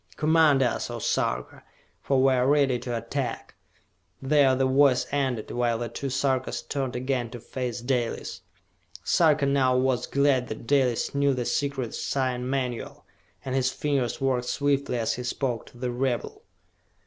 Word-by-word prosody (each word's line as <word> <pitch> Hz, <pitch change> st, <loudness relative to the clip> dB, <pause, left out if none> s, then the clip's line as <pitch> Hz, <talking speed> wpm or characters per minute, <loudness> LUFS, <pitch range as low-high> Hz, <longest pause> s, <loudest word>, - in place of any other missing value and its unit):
Command 155 Hz, -3 st, +4 dB
us, 120 Hz, -, -1 dB
O -, -, -4 dB
Sarka, -, -, -2 dB, 0.4 s
for 135 Hz, -1 st, +2 dB
we 135 Hz, 0 st, +5 dB
are 125 Hz, 0 st, +2 dB
ready 140 Hz, -3 st, +3 dB
to 120 Hz, -1 st, -3 dB
attack!" 115 Hz, +1 st, -4 dB, 0.7 s
There 135 Hz, -1 st, +3 dB
the 135 Hz, +1 st, +1 dB
voice 130 Hz, -1 st, +4 dB
ended, 130 Hz, -6 st, -1 dB
while 120 Hz, -1 st, 0 dB
the 120 Hz, 0 st, -4 dB
two 135 Hz, +4 st, -4 dB
Sarkas 130 Hz, -1 st, -1 dB
turned 135 Hz, -3 st, -3 dB
again 125 Hz, -1 st, -1 dB
to 120 Hz, +1 st, -8 dB
face 125 Hz, 0 st, -5 dB
Dalis. 120 Hz, -6 st, -2 dB, 0.6 s
Sarka 155 Hz, -4 st, +3 dB
now 135 Hz, -2 st, +2 dB
was 130 Hz, -1 st, +1 dB
glad 140 Hz, -3 st, +2 dB
that 110 Hz, +1 st, -7 dB
Dalis 130 Hz, -4 st, +1 dB
knew 140 Hz, -1 st, +2 dB
the 125 Hz, -1 st, -2 dB
secret 140 Hz, -4 st, -2 dB
sign 130 Hz, -2 st, -2 dB
manual, 130 Hz, -3 st, -3 dB, 0.4 s
and 130 Hz, -, -3 dB
his 130 Hz, -1 st, +2 dB
fingers 140 Hz, -5 st, -1 dB
worked 130 Hz, -2 st, 0 dB
swiftly 140 Hz, -1 st, 0 dB
as 115 Hz, -1 st, 0 dB
he 125 Hz, -, -5 dB
spoke 120 Hz, -1 st, -2 dB
to -, -, -16 dB
the 125 Hz, 0 st, -3 dB
rebel. 125 Hz, 0 st, -2 dB
130 Hz, 160 wpm, -26 LUFS, 125-140 Hz, 0.7 s, we